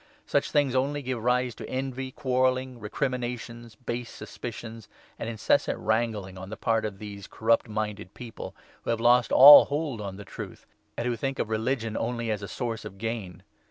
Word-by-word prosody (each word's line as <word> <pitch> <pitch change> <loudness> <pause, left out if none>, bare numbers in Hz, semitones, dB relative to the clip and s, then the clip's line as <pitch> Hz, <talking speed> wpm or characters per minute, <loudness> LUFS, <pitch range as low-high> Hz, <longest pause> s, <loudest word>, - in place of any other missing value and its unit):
Such - - +1
things 145 -4 +2
only 140 +2 0
give 125 -3 -3
rise 125 0 +2
to - - -9
envy, 130 0 -3
quarrelling, 130 -1 0
recriminations, 120 0 -4
base 120 +1 -5
suspicions, 115 -2 -8 0.3
and 115 - -3
incessant 110 -2 +1
wrangling 110 -4 -1
on 95 - -6
5 - - -12
the 110 - -6
part 115 -1 +1
of 105 -2 -4
these 100 -1 -8
corrupt 115 +1 +1
minded 105 -3 -4
people 120 -3 -8 0.3
who - - -5
have 115 -1 +1
lost 120 0 +4
all 145 +2 +11
hold 145 -6 -2
on 100 -2 -5
the 100 - -9
Truth, - - -9 0.3
and 120 - -2
who 120 - 0
think 135 +4 -3
of - - -2
religion 115 0 -1
only 115 -1 -2
as 105 -1 -2
a 100 - -5
source 115 -2 -4
of 95 - -9
gain. 100 -5 -5
115 Hz, 185 wpm, -27 LUFS, 110-130 Hz, 0.3 s, all